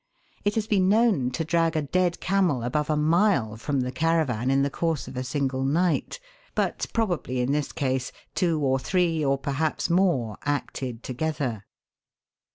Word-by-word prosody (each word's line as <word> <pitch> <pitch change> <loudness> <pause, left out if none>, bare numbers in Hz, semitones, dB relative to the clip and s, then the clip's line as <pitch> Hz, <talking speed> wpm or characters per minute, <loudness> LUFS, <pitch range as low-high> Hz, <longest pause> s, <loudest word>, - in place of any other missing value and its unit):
It 205 0 0
has 220 -2 0
been 195 -4 +2
known 210 - +3
to 130 +6 -3
drag 165 0 +1
a 155 - +1
dead 175 +4 0
camel 180 -10 +1
above 150 +5 -1
a 155 - +2
mile 155 - +2
from 135 +4 -1
the 125 0 -2
caravan 150 -7 +1
in 135 +1 +3
the 140 - 0
course 160 -4 -1
of - - -9
a 125 - -2
single 135 0 -1
night, 170 - 0 0.4
but - - -1
probably 175 - -1
in 125 +2 +1
this 145 0 -1
case 130 -2 -1 0.2
two 165 0 +1
or 135 -1 +2
three, 170 0 +1
or 135 -1 +2
perhaps 145 +5 -1
more, 170 - +1
acted 130 -4 -3
together. 130 -6 -3
150 Hz, 165 wpm, -26 LUFS, 130-170 Hz, 0.4 s, known